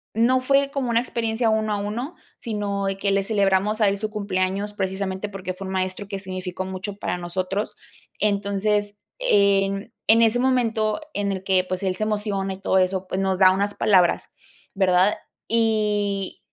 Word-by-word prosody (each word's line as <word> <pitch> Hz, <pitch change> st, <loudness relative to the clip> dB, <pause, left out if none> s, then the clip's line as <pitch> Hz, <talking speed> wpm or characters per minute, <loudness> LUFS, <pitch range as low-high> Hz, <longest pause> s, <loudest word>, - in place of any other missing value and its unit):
no 250 Hz, +3 st, +3 dB
fue 275 Hz, +1 st, +2 dB
como 275 Hz, -4 st, -2 dB
una 230 Hz, 0 st, +3 dB
experiencia 230 Hz, -1 st, -1 dB
uno 215 Hz, -1 st, +1 dB
a -, -, 0 dB
uno, 230 Hz, -, -4 dB, 0.2 s
sino 205 Hz, -3 st, -2 dB
de 195 Hz, 0 st, -1 dB
que 200 Hz, 0 st, 0 dB
le 195 Hz, 0 st, +2 dB
celebramos 200 Hz, +1 st, +1 dB
a 210 Hz, -, +5 dB
él 200 Hz, 0 st, 0 dB
su 215 Hz, +1 st, -2 dB
cumpleaños, 200 Hz, -1 st, -2 dB
precisamente, 190 Hz, 0 st, -3 dB
porque 190 Hz, -2 st, -5 dB
fue 190 Hz, +1 st, -8 dB
un 190 Hz, -, -4 dB
maestro 185 Hz, +1 st, -2 dB
que 200 Hz, -1 st, -4 dB
significó 185 Hz, -1 st, -5 dB
mucho 190 Hz, +2 st, -5 dB
para 190 Hz, -, -2 dB
nosotros. 185 Hz, +3 st, -3 dB, 0.4 s
Entonces, 205 Hz, 0 st, 0 dB, 0.2 s
en 200 Hz, -, +2 dB, 0.2 s
en 225 Hz, +1 st, +7 dB
ese 230 Hz, +1 st, +4 dB
momento 235 Hz, -2 st, +1 dB
en 200 Hz, -1 st, -1 dB
el 190 Hz, 0 st, -5 dB
que, 185 Hz, -1 st, +2 dB
pues, 185 Hz, +1 st, -3 dB
él 185 Hz, -1 st, 0 dB
se 215 Hz, -, -1 dB
emociona 205 Hz, -2 st, -1 dB
y 190 Hz, -, -11 dB
todo 190 Hz, -, +2 dB
eso, 185 Hz, 0 st, +1 dB
pues, 190 Hz, -, -2 dB
nos 190 Hz, -1 st, 0 dB
da 185 Hz, -1 st, +7 dB
unas 200 Hz, +2 st, 0 dB
palabras, 185 Hz, -4 st, +3 dB, 0.5 s
¿verdad? 190 Hz, 0 st, +3 dB, 0.3 s
Y 210 Hz, -3 st, 0 dB
200 Hz, 180 wpm, -23 LUFS, 190-215 Hz, 0.5 s, en